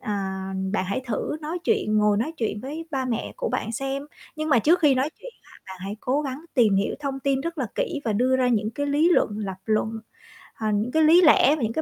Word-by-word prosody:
à, 210 - -4 0.6
bạn 200 -3 0
hãy 195 +6 -2
thử 240 +5 -2
nói 320 +3 -4
chuyện, 385 - +1
ngồi 210 -1 +3
nói 245 +10 -1
chuyện 215 -5 -2
với 305 +6 -6
ba 270 -3 -1
mẹ 235 -3 -3
của - - -2
bạn 225 - -2
xem, 270 +3 -3 0.3
nhưng 310 0 -3
mà 265 -6 +5
trước 330 +9 +4
khi 290 -4 +5
nói 265 +4 0
chuyện - - -9
á, - - -22 0.2
là 190 - -8
hãy 200 +2 -5
cố 275 +4 0
gắng 275 +3 -5
tìm 215 -6 +4
hiểu 195 - 0
thông 275 -1 -3
tin 270 0 +1
rất 335 +1 -5
là 260 - -1
kỹ 380 -13 -2
và 220 - 0
đưa 255 +5 +2
ra 255 -1 +2
những 215 -3 +1
cái 285 +5 -3
lý 295 +4 +3
luận, - - +4
lập 195 -3 -4
luận, 220 +1 -1 0.5
ờ, 220 - -4
những 210 +4 0
cái 320 +3 +3
lý 330 +4 +7
lẽ 300 -4 +6
và 305 - -6
những 225 0 -1
cái 315 - -1
260 Hz, 255 wpm, -24 LUFS, 220-305 Hz, 0.6 s, lý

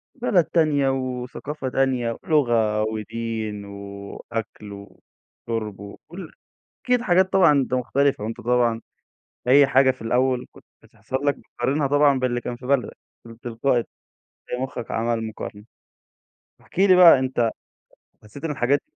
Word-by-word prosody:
بلد 210 -9 +2
تانية، 150 -5 +2
وثقافة 130 +2 -4
تانية، 125 -3 0
ولغة، 120 - +2
ودين، 110 -1 -4
وأكْل، 100 +2 -8
وشُرب، 105 +1 -8
وكُلّ 160 - -10 0.5
أكيد 250 -1 +2
حاجات 185 -3 +2
طبعًا 180 -5 +6
أنت 135 -3 +1
مختلفة، 130 -1 +1
وأنت 110 +1 -5
طبعًا 120 -1 +1 0.7
أي 140 +2 +7
حاجة 130 0 +4
في 130 -3 -6
الأول 125 +2 +1
كنت - - -17 0.2
بتحصل 110 +5 -6
لك 140 - +3
بتقارنها 140 +4 -2
طبعًا 145 -1 +3
باللي 120 -1 -1
كان 120 - -5
في 125 0 -11
بلدك 135 -2 0 0.3
من 115 0 -13
تلقائي 120 +1 0 0.6
تلاقي 125 +1 -3
مُخّك 130 -3 -6
عمل 115 0 -1
مقارنة، 105 -1 -7 1.0
احكِ - - -15
لي 190 -1 +6
بقى 170 -6 +9
أنت 130 -3 0 0.7
حسيت 105 +8 -13
إن 155 - -1
الحاجات 140 +1 +1
125 Hz, 135 wpm, -23 LUFS, 115-140 Hz, 1.0 s, بقى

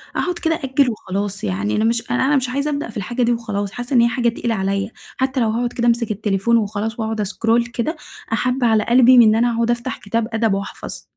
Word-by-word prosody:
أقعُد 355 -1 -1
كده 325 -1 +1
أأجّل 270 -3 +1
وخلاص، 200 -2 -4
يعني 100 +2 -1
أنا 215 - +1
مش 230 +1 0
أن 245 - +1
أنا 280 +3 +2
مش 255 -2 0
عايزة 280 +3 -1
أبدأ 285 -4 -3
في 215 - -8
الحاجة 240 +6 -2
دي 240 - +2
وخلاص، 205 -4 -2
حاسة 245 +3 -6
إن 235 - +6
هي 235 - +5
حاجة 240 -1 +1
تقيلة 230 0 -2
عليّا، 195 +2 -1 0.3
حتى 260 0 0
لو 225 -2 +2
هاقعُد 240 +2 -1
كده 240 0 0
أمسِك 230 -2 +1
التليفون 210 +2 +1
وخلاص، 215 +2 -2
وأقعد 220 -1 -2
أسكرول 230 +3 +1
كده 245 +6 -3 0.4
أحب 250 +3 0
على 220 -2 +3
قلبي 250 +1 +6
من 240 - +9
إن 215 - +4
أنا 235 0 +2
أقعُد 235 +1 +1
أفتح 240 +2 -3
كتاب 225 +2 -2
أدب 225 -2 +1
وأحفظ. 200 0 -5
230 Hz, 230 wpm, -20 LUFS, 215-245 Hz, 0.4 s, من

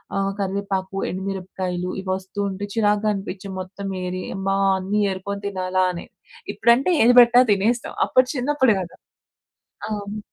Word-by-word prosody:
ఆహ్, 195 0 0
కరివేపాకు 195 -1 -2
ఎండుమిరపకాయలు 185 -1 -4
ఇవి 190 - -7
వస్తూ 190 +2 -8
ఉంటే 195 +1 -5
చిరాకుగా 210 -1 +2
అనిపించి 195 -1 -6
మొత్తం 190 +2 -7 0.2
ఏరి, 180 0 -4
అమ్మా! 195 0 -1 0.2
అన్నీ 195 +3 -1
ఏరుకొని 200 +1 -5
తినాలా 185 -1 0
అని. 170 - -7 0.5
ఇప్పుడంటే 235 +9 +3
ఏది 245 +2 +5
పెట్టినా 240 +1 +6
తినేస్తాం. 220 +5 0
అప్పుడు 255 0 +4
చిన్నప్పుడు 260 -2 +2
గదా! 175 - -9 0.9
అవును. 205 0 -4
195 Hz, 135 wpm, -22 LUFS, 190-215 Hz, 0.9 s, పెట్టినా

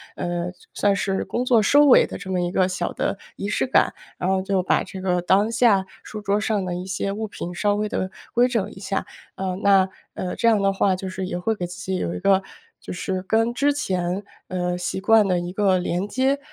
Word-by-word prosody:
呃， 175 0 -3 0.2
算 205 -1 +2
算 - - 0
是 195 -1 -1
工 245 - -2
作 240 -3 +4
收 290 +7 +6
尾 275 - +7
的 - - -6
这 200 - -9
么 185 - +1
一 175 0 -1
个 185 0 +2
小 180 -1 -2
的 - - -1 0.2
仪 200 - -3
式 - - +1
感。 255 - +3 0.2
然 180 - -1
后 190 0 +2
就 190 -1 0
把 - - +2
这 190 - -8
个 180 -1 +1
当 195 +5 +3
下 220 -5 +4 0.2
书 215 - -7
桌 205 0 +1
上 215 -2 0
的 180 -1 -3
一 180 +1 -5
些 190 +1 -2
物 220 +2 -3
品 175 -3 -6
稍 205 +1 +1
微 210 +1 -1
地 185 - -2 0.2
规 245 +1 +4
整 210 -5 -1
一 190 - -12
下。 195 0 -2 0.3
呃， 185 -1 -2
那 195 -1 +5 0.2
呃， 180 - -4
这 - - -1
样 210 -3 +3
的 195 - +3
话 195 0 +2
就 190 - -5
是 185 0 -4
也 180 - -3
会 220 +5 0
给 180 - -3
自 175 - -9
己 190 -1 -2
有 170 - -2
一 - - -4
个 195 0 +3 0.4
就 - - -7
是 185 +1 -3
跟 225 +4 +1
之 285 +3 +2
前， 185 -7 -2 0.2
呃， 180 -1 -2
习 180 +1 -3
惯 220 0 +5
的 180 -2 +2
一 175 0 -4
个 195 -2 +3
连 180 +1 -1
接。 265 +5 +1
195 Hz, 260 characters per minute, -23 LUFS, 185-210 Hz, 0.4 s, 尾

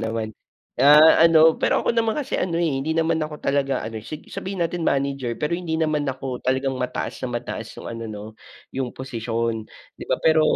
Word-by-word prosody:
naman. 110 -1 -3 0.5
Ah, 150 +3 +8
ano 160 -1 +7
pero - - +2
ako - - +2
naman 225 +1 +1
kasi 280 -2 -3
ano, 170 -2 -1
eh, 150 -6 0
hindi 160 +3 -2
naman 160 0 +1
ako 155 0 -4
talaga 140 -1 0
ano 110 -1 -6 0.3
sabihin 190 -2 -3
natin 175 +1 -3
manager, 135 -5 -1
pero 150 +3 -1
hindi 170 -2 -2
naman 155 -2 +1
ako 130 -1 -4
talagang 130 +1 0
mataas 125 0 -3
na 130 - -2
mataas 115 -2 -5
yung - - -9
ano 115 0 -6
no, 105 -1 -7 0.5
yung 130 -2 -2
posisyon 115 -3 -2 0.3
di - - -9
ba, - - +3
pero 160 -1 +5
140 Hz, 190 wpm, -23 LUFS, 125-160 Hz, 0.5 s, Ah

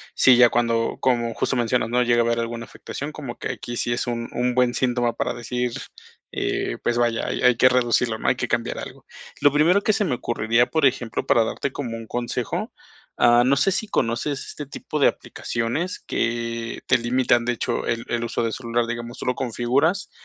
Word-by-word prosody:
sí, 125 -2 +6
ya 120 -1 +7
cuando, 115 -1 0
como 120 -3 +1
justo 130 - -1
mencionas, 120 -1 +1
¿no?, 125 +1 +2
llega 120 -1 +3
a - - -2
haber 115 0 +1
alguna 115 0 -4
afectación, 145 +5 -7
como 135 -6 -7
que - - -3
aquí 120 -1 -6
sí 120 - 0
es 120 - -2
un 115 -1 -3
un 125 0 0
buen 125 -1 +3
síntoma 120 -2 0
para - - -2
decir: 120 0 -3 0.6
"Eh, - - -2
pues, 120 0 0
vaya, 120 -1 +1
hay - - -3
hay 125 -1 +6
que 130 - +6
reducirlo, 120 -2 +1
¿no? - - -4
Hay - - +4
que - - -3
cambiar - - -1
algo". - - -9 0.3
Lo 145 0 +5
primero 170 +7 +4
que 215 - +2
se 220 - +1
me 160 -10 0
ocurriría, 115 0 +1
por 155 -4 +4
ejemplo, 120 -3 -3
para 115 - +4
darte 135 +4 -3
como 125 -5 -5
un 115 -1 -8
consejo, 120 - -3 0.5
ah, 120 0 +6
no 135 +2 +4
sé 195 - +2
si 205 +3 -2
conoces 130 - -1
este 145 -2 -8
tipo 150 +1 -5
de - - +6
aplicaciones 120 +11 -3
que 115 0 -2
te 130 -2 +4
limitan, 120 0 +2
de 120 - +1
hecho, 120 0 -2
el 115 0 -2
el 120 0 -1
uso 120 0 -2
del 115 - -1
celular, 120 -1 -1
digamos, 120 +1 -5
tú - - -7
lo 125 - +1
configuras 130 - 0
120 Hz, 210 wpm, -23 LUFS, 115-130 Hz, 0.6 s, ya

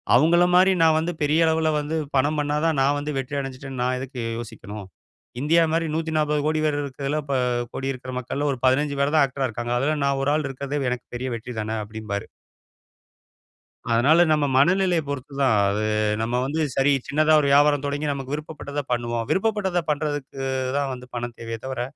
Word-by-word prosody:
அவர்கள 170 +6 +5
மாரி 185 +1 +6
நா - - +6
வந்து 165 +2 0
பெரிய 150 +2 +2
அளவுல 160 0 +2
வந்து 150 +2 -2 0.2
படம் 145 +3 +2
பண்ணதான் 150 +1 0
நா - - +4
வந்து 145 +1 -3
வெற்றி 135 +2 -3
அடஞ்சுட்டனு 135 -1 -6
நா 125 - +1
எதுக்கு 130 -1 -6 0.2
யோசிக்கணும்? 105 -3 -8 0.6
இந்தியா 165 +4 +4
மாரி 165 0 +1
140 155 -2 0
கோடி 155 0 +1
பேர் 145 -1 +1
இருக்குறதுல 140 +2 -3
ப 140 - 0 0.4
கோடி 135 0 -2
இருக்குற 130 0 -8
மக்கள 140 +4 -3
ஒரு 130 - -4
15 140 +2 +2
பேர் 140 +2 +1
தான் 150 - +6
ஆக்டரா 135 0 -2
இருக்காங்க. 120 +2 -3
அதுல 150 +4 0
நா 140 - +2
ஒரு 145 - +2
ஆள் 155 -2 -1
இருக்கிறதே 140 +2 -4
எனக்கு 125 - -4
பெரிய 130 +2 -3
வெற்றி 120 +2 -7
தானே! 110 +1 -3
அப்படின்பாரு. 105 -1 -5 1.6
அதனால 135 +8 +4
நம்ம 150 -1 +3
மனநெலைய 180 +4 +3
பொறுத்துதான். 140 -3 0
அது 105 +2 -1 0.4
நம்ம 115 +2 -1
வந்து, 155 +4 -2 0.2
சரி 135 +1 +3 0.2
சின்னதா 155 +2 +3
ஒரு 145 - +1
வியாபாரம் 145 0 +4
தொடங்கி 145 +1 -2
நமக்கு 135 0 -5
விருப்பப்பட்டத 150 -1 -5
பண்ணுவோம். 120 -1 -1
விருப்பப்பட்டத 190 -4 +1
பண்ணுறதுக்கு 145 -2 -2 0.4
தான் 140 -1 -1
வந்து 125 0 -9
பணம் 120 0 -4
தேவையே 115 -1 -5
தவர, 130 -2 -3
140 Hz, 175 wpm, -24 LUFS, 130-155 Hz, 1.6 s, மாரி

